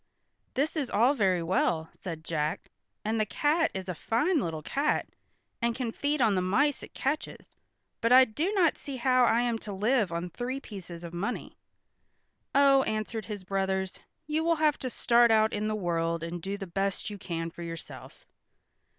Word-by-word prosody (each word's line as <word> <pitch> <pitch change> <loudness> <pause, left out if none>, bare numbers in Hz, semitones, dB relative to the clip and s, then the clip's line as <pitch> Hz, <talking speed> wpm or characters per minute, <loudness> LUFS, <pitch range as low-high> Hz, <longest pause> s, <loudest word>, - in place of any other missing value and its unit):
"This 285 +6 0
is 285 -6 -1
all 240 +6 +4
very 190 -9 +2
well," 165 -2 +1
said 165 -4 -7
Jack, 155 -2 -2 0.3
"and 220 +1 0
the 215 - +2
cat 315 +7 +2
is 190 -1 -4
a 180 - -2
fine 270 - +1
little 160 - -3
cat 285 - 0 0.5
and 235 0 +1
can 250 -3 -2
feed 285 +2 0
on 220 -3 +4
the 185 - +1
mice 265 +11 +2
it - - -12
catches, 285 +4 -3 0.5
but 230 - +2
I 260 +1 +9
do 300 - -1
not 355 -6 +3
see 275 -2 -6
how 255 0 +4
I 235 0 +3
am 240 -2 0
to 210 - -7
live 210 0 +1
on 170 +1 -3
three 250 +8 -3
pieces 180 -8 -9
of 170 0 -7
money." 200 +8 -4 1.0
"Oh," 275 -1 +6
answered 215 -2 -2
his 205 -3 -6
brothers, 190 0 -1 0.3
"you 310 +1 0
will 335 0 +3
have 305 -2 +2
to 255 - -3
start 235 0 +4
out 220 -1 +4
in 210 +1 -1
the 215 - 0
world 170 -4 -1
and 170 +1 -5
do 195 +3 -3
the 200 - -5
best 195 +3 -2
you 205 - -7
can 165 -2 -4
for 170 - -11
yourself." 165 -1 -9
215 Hz, 185 wpm, -29 LUFS, 180-265 Hz, 1.0 s, I